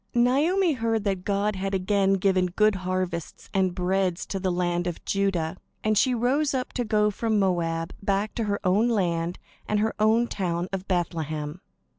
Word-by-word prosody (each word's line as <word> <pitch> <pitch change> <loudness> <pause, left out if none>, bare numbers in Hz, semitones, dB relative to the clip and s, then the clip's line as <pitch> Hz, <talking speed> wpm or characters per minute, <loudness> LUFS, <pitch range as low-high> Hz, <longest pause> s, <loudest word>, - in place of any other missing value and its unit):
Naomi 305 +9 +3
heard 225 -4 0
that 195 -3 -1
God 205 +1 0
had 195 +1 -2
again 195 +1 +2
given 190 -1 +2
good 215 +4 +3
harvests 185 -3 -4
and 190 -2 +1
bread 185 0 +1
to 195 - -4
the 185 -1 0
land 175 0 0
of 175 - -5
Judah, 190 -4 0 0.3
and 215 0 +2
she 250 +4 +3
rose 270 +5 +1
up 255 -1 -3
to 245 - -1
go 210 -1 +2
from 220 +1 0
Moab 170 -4 0
back 200 +1 0
to 230 - -2
her 200 -1 -1
own 205 +5 +3
land 175 -5 0 0.3
and 210 - +1
her 220 +1 +1
own 220 +2 +4
town 180 -5 -2
of 190 0 -4
Bethlehem. 160 -3 -2
195 Hz, 175 wpm, -26 LUFS, 180-215 Hz, 0.3 s, own